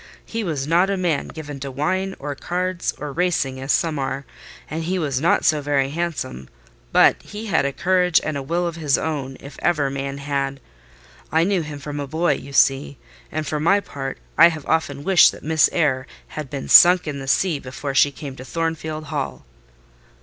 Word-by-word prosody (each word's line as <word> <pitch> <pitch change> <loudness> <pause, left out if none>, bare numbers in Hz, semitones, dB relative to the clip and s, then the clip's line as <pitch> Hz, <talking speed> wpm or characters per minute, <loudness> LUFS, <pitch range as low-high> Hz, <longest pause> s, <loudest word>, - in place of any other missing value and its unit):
He 225 0 -3
was 150 -8 -2
not 170 +5 +3
a 200 - 0
man 170 -6 0
given 145 -3 -8
to 140 +1 -5
wine, 185 +8 -1
or 145 +1 -5
cards, 180 +4 -2
or 150 -1 -5
racing, 160 -6 0
as 135 +2 -1
some 160 -4 +1
are, 135 +1 -3 0.4
and 160 +1 -4
he 185 +2 -1
was 140 -6 -1
not 170 - +2
so 150 -1 +3
very 140 -1 0
handsome; 155 - -4 0.4
but - - +5
he 215 +1 -8
had 180 -9 +1
a 140 - 0
courage 180 +2 +2
and 155 - -2
a 140 - -2
will 170 +6 -1
of 170 -1 -3
his 150 -4 +2
own, 140 -4 -3
if 140 - -11
ever 145 -5 +1
man 140 0 -4
had. 140 -1 -2 0.7
I 160 +1 +3
knew 190 0 +1
him 150 -2 -6
from 145 +1 -6
a 140 - -4
boy, 160 +2 +1
you 140 - -8
see: 135 0 +2 0.3
and 155 0 -3
for 150 - -2
my 195 +7 +4
part, 135 -8 -6 0.2
I 170 - +10
have 160 -4 -4
often 145 -3 -1
wished 190 +1 +6
that - - -12
Miss 160 0 +3
Eyre 135 -5 +1 0.2
had 150 -3 -6
been 140 -1 -5
sunk 180 +1 +8
in 145 -2 -3
the 135 - -7
sea 160 +2 +2
before 135 +2 -5
she 140 +2 +4
came 140 -1 -8
to 130 - -8
Thornfield 160 +1 -3
Hall." 65 - -4
150 Hz, 200 wpm, -22 LUFS, 140-170 Hz, 0.7 s, I